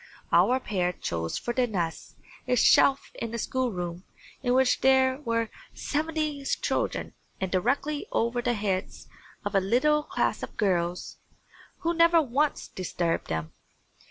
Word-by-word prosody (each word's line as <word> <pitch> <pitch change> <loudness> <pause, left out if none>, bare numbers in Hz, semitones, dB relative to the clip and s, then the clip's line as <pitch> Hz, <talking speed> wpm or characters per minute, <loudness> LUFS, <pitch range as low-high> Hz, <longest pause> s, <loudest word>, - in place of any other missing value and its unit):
Our 255 +1 +4
pair 180 -7 -1
chose 80 - -3
for 240 - -3
their 250 0 +2
nest 175 -7 -3 0.3
a 250 - +2
shelf 270 +3 +4
in 230 0 -4
a - - -2
schoolroom 185 -9 -2 0.4
in 250 -1 +1
which 260 -1 +3
there 265 0 +4
were 230 -5 -1 0.3
seventy 305 -1 -2
children - - -1 0.3
and 190 -1 -2
directly 275 +10 0
over 235 +1 0
the 240 0 0
heads 200 -3 -3 0.4
of - - -2
a 195 - +5
little 255 +10 +2
class - - -1
of - - -7
girls, 180 -4 -1 0.6
who 335 -1 +1
never 335 0 +5
once 290 +1 0
disturbed 175 -2 -2
them. 80 0 -3
240 Hz, 140 wpm, -27 LUFS, 185-275 Hz, 0.6 s, a